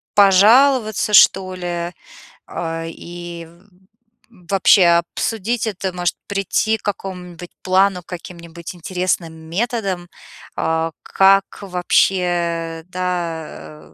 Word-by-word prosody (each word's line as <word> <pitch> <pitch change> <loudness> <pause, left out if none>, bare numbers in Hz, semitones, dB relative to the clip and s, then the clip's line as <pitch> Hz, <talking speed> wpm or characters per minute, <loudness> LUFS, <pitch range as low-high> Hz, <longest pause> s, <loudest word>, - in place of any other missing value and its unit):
пожаловаться, 215 +3 +4
что 190 -1 +5
ли, 175 -1 -4 0.6
а, 165 -1 -4
и 170 0 -9 0.8
вообще 195 -2 +3 0.3
обсудить 225 +1 -1
это, 190 -2 -3
может, 175 -1 -1
прийти 200 +2 0
к - - -25
какому-нибудь 180 -3 -6
плану, 190 0 +2
каким-нибудь 170 -1 -9
интересным 180 -1 -2
методам, 185 +2 -3 0.5
а, 160 0 -1
как 195 0 +3
вообще, 175 -3 0
да, 160 - -5
180 Hz, 85 wpm, -19 LUFS, 170-195 Hz, 0.8 s, что